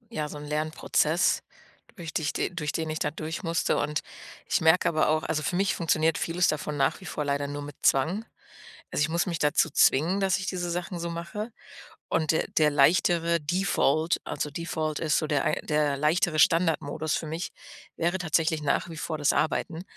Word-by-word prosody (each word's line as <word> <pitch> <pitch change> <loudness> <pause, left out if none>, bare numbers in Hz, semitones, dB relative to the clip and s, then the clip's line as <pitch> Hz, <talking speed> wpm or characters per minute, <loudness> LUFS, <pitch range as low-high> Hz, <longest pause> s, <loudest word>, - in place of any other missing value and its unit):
ja, 150 -1 -1
so 150 - -8
'n 145 - -8
Lernprozess, 155 +2 +1 0.5
durch 170 -6 -7
dich 155 -2 -1
de - - -1
durch 155 -4 -3
den 160 -1 -3
ich 155 - -2
da 150 - -1
durchmusste 160 +2 -1
und 150 0 0 0.5
ich - - +2
merke 160 +2 +4
aber 155 -2 +2
auch 155 0 +2
also 155 -1 -1
für 160 - -1
mich 195 +2 +1
funktioniert 160 -1 +1
vieles 175 +2 +1
davon 150 0 -2
nach 135 - +1
wie - - -11
vor 150 - -3
leider 140 0 0
nur 145 0 -5
mit 145 -1 -8
Zwang. 170 +12 +2 0.7
Also, - - +1
ich 145 - +1
muss 170 +3 0
mich 170 -3 -3
dazu 150 +2 +3
zwingen, 165 +8 +3
dass 190 -2 +2
ich 190 - -5
diese 175 -2 -2
Sachen 175 0 -4
so 170 0 -3
mache 170 +7 -5 0.6
und 155 -2 0
der 160 - 0
der 155 -1 +3
leichtere 170 +3 +3
Default, 160 -1 +1
also: 150 - -3
„Default" 155 -1 -3
ist 155 -2 +1
so 155 - 0
der 145 -2 0
ein - - +2
der 150 -2 +1
leichtere 155 +2 +1
Standardmodus 160 -2 +2
für - - -3
mich, 160 +3 -4 0.4
wäre 175 +3 0
tatsächlich 160 -2 +1
nach 150 +4 0
wie 160 - -8
vor 155 0 -3
das 145 -1 +2
Arbeiten, 160 +2 -1
160 Hz, 195 wpm, -27 LUFS, 150-170 Hz, 0.7 s, merke